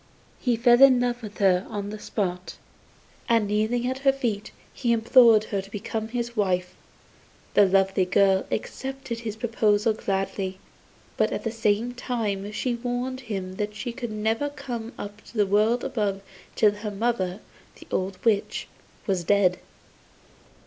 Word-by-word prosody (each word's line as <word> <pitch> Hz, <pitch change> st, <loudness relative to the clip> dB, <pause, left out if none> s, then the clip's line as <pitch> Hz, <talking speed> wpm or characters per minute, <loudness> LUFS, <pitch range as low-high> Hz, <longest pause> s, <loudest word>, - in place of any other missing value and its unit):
He 245 Hz, -3 st, +1 dB
fell 240 Hz, +2 st, +5 dB
in 265 Hz, -2 st, +8 dB
love 245 Hz, 0 st, -1 dB
with 210 Hz, -2 st, -9 dB
her 185 Hz, -2 st, +3 dB
on 205 Hz, -2 st, -4 dB
the 215 Hz, -, -7 dB
spot, 185 Hz, -4 st, -3 dB, 0.7 s
and 230 Hz, -3 st, +3 dB
kneeling 215 Hz, +4 st, 0 dB
at 260 Hz, +1 st, -2 dB
her 275 Hz, 0 st, +4 dB
feet, 230 Hz, -7 st, -3 dB, 0.2 s
he 240 Hz, -3 st, +1 dB
implored 230 Hz, -1 st, +6 dB
her 200 Hz, -2 st, -2 dB
to 195 Hz, -, -14 dB
become 220 Hz, +2 st, -4 dB
his 240 Hz, 0 st, -4 dB
wife. 180 Hz, -4 st, 0 dB, 0.8 s
The 205 Hz, -, +6 dB
lovely 190 Hz, 0 st, +3 dB
girl 190 Hz, +1 st, +3 dB
accepted 265 Hz, +1 st, -4 dB
his 220 Hz, -3 st, -5 dB
proposal 220 Hz, -1 st, +2 dB
gladly; 195 Hz, -2 st, -2 dB, 0.6 s
but -, -, +2 dB
at -, -, -3 dB
the 225 Hz, -, -1 dB
same 225 Hz, +1 st, 0 dB
time 210 Hz, -5 st, -3 dB
she 245 Hz, +3 st, -1 dB
warned 245 Hz, +2 st, -3 dB
him 195 Hz, -6 st, -5 dB
that 210 Hz, 0 st, -3 dB
she 235 Hz, +3 st, -4 dB
could 240 Hz, -1 st, -5 dB
never 220 Hz, +6 st, 0 dB
come 245 Hz, -5 st, -6 dB
up 205 Hz, +1 st, -8 dB
to 235 Hz, -, -12 dB
the 205 Hz, -, +4 dB
world 215 Hz, +5 st, +2 dB
above 200 Hz, -4 st, -1 dB, 0.3 s
till 210 Hz, -2 st, +5 dB
her 210 Hz, +1 st, -5 dB
mother, 200 Hz, -3 st, -1 dB, 0.4 s
the -, -, -14 dB
old 190 Hz, 0 st, -1 dB
witch, 210 Hz, -3 st, +1 dB, 0.4 s
was 190 Hz, -4 st, 0 dB
dead. 185 Hz, -1 st, +3 dB
215 Hz, 155 wpm, -25 LUFS, 200-240 Hz, 0.8 s, in